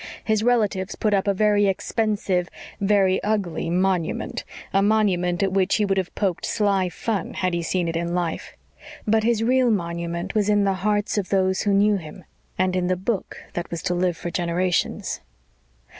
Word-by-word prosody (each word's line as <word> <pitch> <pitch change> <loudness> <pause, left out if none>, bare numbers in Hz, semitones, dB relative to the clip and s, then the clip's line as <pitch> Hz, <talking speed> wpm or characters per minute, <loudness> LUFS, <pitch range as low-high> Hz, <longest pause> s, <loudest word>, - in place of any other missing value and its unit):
His 215 -1 +1
relatives 215 -5 +1
put 210 -1 0
up 195 0 +1
a 200 - +3
very 205 0 +3
expensive, 195 -2 0 0.3
very 195 -2 +3
ugly 200 -6 -1
"monument" 180 -1 0 0.3
a 195 - +4
monument 195 -4 +2
at 195 - +1
which 190 0 +2
he 210 - +2
would 195 -1 +1
have 185 - -5
poked 190 -5 -1
sly 200 -4 +1
fun 200 0 -3
had 185 -1 0
he 170 - 0
seen 175 +1 -1
it 165 - -2
in 170 +1 -1
life. 175 -2 -3 0.5
But 220 0 +2
his 225 -1 +2
real 255 +1 +3
monument 170 -2 -2
was 210 -1 +1
in 205 -1 +3
the 195 -1 +2
hearts 210 +1 +1
of 190 - -4
those 190 -1 +2
who 205 - +1
knew 205 +1 +4
him, 170 +1 -10 0.3
and 185 0 +1
in 180 -1 0
the 185 0 +1
book 195 +2 -3 0.2
that 175 -1 -4
was 170 -2 -5
to 180 - 0
live 175 -1 0
for 175 - -5
generations. 175 +1 -1
190 Hz, 185 wpm, -23 LUFS, 180-210 Hz, 0.5 s, a